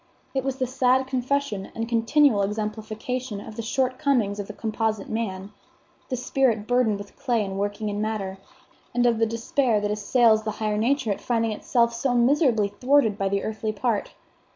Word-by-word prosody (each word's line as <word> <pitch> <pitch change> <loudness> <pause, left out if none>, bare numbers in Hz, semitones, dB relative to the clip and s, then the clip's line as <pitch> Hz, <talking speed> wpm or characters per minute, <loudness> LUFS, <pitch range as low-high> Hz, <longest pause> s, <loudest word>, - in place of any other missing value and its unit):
It 265 -1 0
was 270 -1 -1
the 260 - 0
sad 255 0 +2
confession 260 -5 -2
and 225 0 -2
continual 235 0 +3
exemplification 215 +3 -3
of 215 +1 -9
the 230 - -4
shortcomings 255 -3 0
of 200 - -4
the 210 - -7
composite 220 -1 -2
man, 200 -3 -3 0.6
the 260 - -1
spirit 250 -3 +1
burdened 245 -3 +2
with 200 0 -10
clay 245 -6 0
and 195 0 -4
working 205 +2 -2
in 205 0 -2
matter, 200 -3 -3 0.6
and 245 0 +3
of 235 -2 +3
the 225 - +3
despair 230 0 +1
that 205 0 -1
assails 220 +1 +3
the 215 -1 -3
higher 215 -1 -1
nature 255 0 +1
at 200 - -3
finding 230 -2 0
itself 235 +2 +1
so 245 +1 0
miserably 240 -4 +3
thwarted 250 0 +2
by 195 -1 -1
the 200 0 -1
earthly 215 0 -2
part. 220 0 -1
225 Hz, 175 wpm, -25 LUFS, 210-255 Hz, 0.6 s, continual